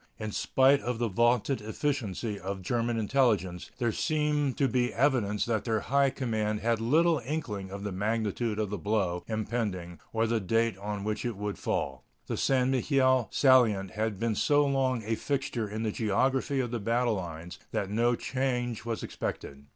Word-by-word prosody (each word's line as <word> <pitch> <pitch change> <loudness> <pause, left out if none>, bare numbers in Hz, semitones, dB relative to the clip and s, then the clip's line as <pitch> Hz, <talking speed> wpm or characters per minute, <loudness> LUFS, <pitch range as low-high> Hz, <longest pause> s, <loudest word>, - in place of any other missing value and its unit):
In 110 -1 -4
spite 135 +6 +3
of 120 -1 -2
the 120 0 0
vaunted 120 +4 +2
efficiency 110 -3 -2
of 95 +1 -4
the 95 - -12
German 120 +3 0
intelligence, 105 -7 +1
there 120 -2 +1
seems 150 -1 0
to 140 - +2
be 125 0 +1
evidence 120 -6 +1
that 110 -3 0
their 110 -3 0
high 140 +3 +3
command 110 -5 -2
had 115 +1 +1
little 160 +5 +3
inkling 115 -9 -4
of 100 +1 -7
the 100 - -3
magnitude 110 +2 -1
of 105 -2 -1
the 105 - -3
blow 95 -5 0
impending 105 -6 -3
or 115 0 +1
the 115 0 +1
date 115 +3 +1
on 105 0 -4
which 105 0 -2
it 120 -4 -3
would 105 0 -4
fall. 65 -1 -2 0.2
The - - -3
St. 130 -1 +2
Mihiel 130 -2 +3
salient 115 -8 +4
had 110 -2 -2
been 115 0 0
so 145 +7 +3
long 130 -4 +1
a 110 +2 -1
fixture 120 -3 -2
in 110 +2 -4
the 110 - 0
geography 130 +6 +1
of 120 -2 -3
the 120 - -2
battle 115 +2 +1
lines 85 -2 -6
that 100 0 -2
no 120 +3 +2
change 125 -3 -2
was 115 -1 -3
expected. 70 0 -5
115 Hz, 180 wpm, -29 LUFS, 105-130 Hz, 0.2 s, salient